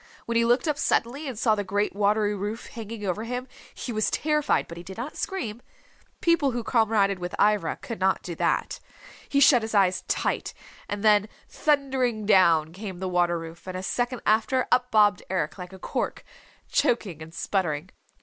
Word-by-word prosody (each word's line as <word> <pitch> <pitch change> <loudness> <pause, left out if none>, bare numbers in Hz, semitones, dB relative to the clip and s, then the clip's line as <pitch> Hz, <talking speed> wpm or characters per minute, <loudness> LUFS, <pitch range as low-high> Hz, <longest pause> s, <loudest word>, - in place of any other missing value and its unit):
When 235 - -3
he 230 0 +4
looked 245 +7 +2
up 295 -1 0
suddenly 275 +6 0
and 255 -5 -5
saw 220 -1 +3
the 205 -1 -1
great 205 +1 -1
watery 210 +1 +2
roof 205 +3 -4
hanging 225 -2 -7
over 195 +3 -2
him, 250 +2 -4 0.3
he 245 - -5
was 215 0 +1
terrified 300 -1 +1
but 170 - -9
he - - -7
did 190 +3 -10
not 250 +6 -5
scream. 240 - -4 0.6
People 335 -5 +3
who 240 -2 -3
comraded 220 -6 +2
with 175 0 -4
Ivra 205 -5 +2
could 230 - -6
not 190 0 +1
do 175 - -5
that. - - -1 0.5
He 280 - +2
shut 270 -3 +6
his 220 0 -4
eyes 185 -2 +3
tight, - - -1 0.3
and 205 0 -4
then 210 -1 +4 0.2
thundering 265 -7 0
down 165 -6 +4
came 190 -1 -7
the 190 +1 -3
water 175 -1 +2
roof, 165 +2 -9
and 185 0 -4
a 185 - -5
second 245 +4 -2
after, 225 +4 +2
up 250 0 +3
bobbed 210 -5 +4
Eric 185 -1 -2
like 180 0 -7
a 190 - -10
cork, - - -3 0.4
choking 220 - 0
and 155 +1 -9
sputtering. 170 -2 -2
210 Hz, 190 wpm, -26 LUFS, 185-245 Hz, 0.6 s, shut